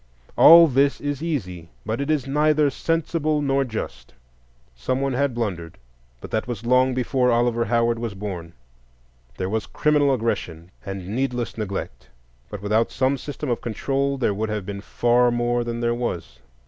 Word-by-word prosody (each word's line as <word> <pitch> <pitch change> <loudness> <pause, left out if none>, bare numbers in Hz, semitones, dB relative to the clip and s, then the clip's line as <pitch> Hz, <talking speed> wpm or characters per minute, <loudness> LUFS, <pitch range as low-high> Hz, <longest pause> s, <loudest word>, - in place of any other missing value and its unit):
All 170 0 +9
this 140 0 +2
is 145 -1 -3
easy, 90 - -4 0.2
but 110 +5 -2
it 140 - -3
is 150 -4 +1
neither 150 +1 +2
sensible 155 0 -1
nor 140 -1 +1
just. 110 - -6 0.6
Someone 130 - -1
had 135 -1 0
blundered, 90 -8 -4 0.4
but - - -9
that 110 +1 -1
was 120 -2 -5
long 125 +1 +3
before 125 0 +1
Oliver 120 0 +2
Howard 115 0 +1
was 115 -4 -4
born; 90 -5 -6 0.8
there 95 - -2
was 110 +2 -2
criminal 150 -2 +2
aggression 90 -9 -2
and 95 -1 -6
heedless 120 +4 -2
neglect, 95 - -5 0.4
but 100 - -8
without 110 +3 +1
some 130 +1 +1
system 145 0 -5
of 120 - -1
control 135 +4 -1
there 120 -5 +1
would 110 +2 -3
have 105 -3 -3
been 100 0 -6
far 120 +3 +2
more 120 0 0
than 120 0 -4
there 120 0 +1
was. 85 - -4
120 Hz, 160 wpm, -23 LUFS, 105-135 Hz, 0.8 s, All